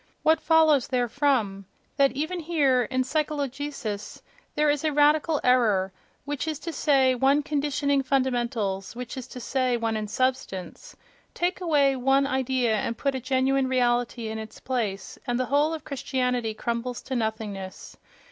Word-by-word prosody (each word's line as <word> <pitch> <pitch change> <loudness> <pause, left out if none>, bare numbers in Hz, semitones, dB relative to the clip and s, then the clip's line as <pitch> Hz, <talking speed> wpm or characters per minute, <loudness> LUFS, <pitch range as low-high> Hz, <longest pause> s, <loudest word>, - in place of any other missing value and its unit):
What 315 +1 +4
follows 315 -5 +4
therefrom? 245 -6 0 0.3
That 275 -1 +3
even 315 +6 -2
here, 295 -6 +2
in 260 0 +1
psychologicis, 280 -6 -3 0.3
there 300 0 +2
is 290 0 -2
a 310 - +1
radical 295 +1 +3
error, 215 -7 +3 0.3
which 290 +1 -3
is 310 -2 -2
to 335 - -5
say 270 -5 +3
one 270 +4 +3
conditioning 285 -1 0
fundamentals, 240 -7 -1
which 245 -1 -6
is 260 -2 -7
to 250 - -9
say, 255 0 0
one 225 -1 -1
in 215 -1 -3
substance. 255 -6 -3 0.4
Take 360 +2 -1
away 290 -6 +3
one 270 +2 +3
idea 260 -4 +1
and 230 +2 -2
put 275 -1 0
a 260 - -2
genuine 265 +1 +1
reality 245 -2 0
in 220 0 -4
its 220 0 -9
place—and 240 0 -3
the 255 - +1
whole 295 +2 +3
of 320 -1 -5
Christianity 250 -4 -1
crumbles 235 +2 -3
to 260 - -4
nothingness! 220 -4 -4
260 Hz, 150 wpm, -26 LUFS, 235-285 Hz, 0.4 s, What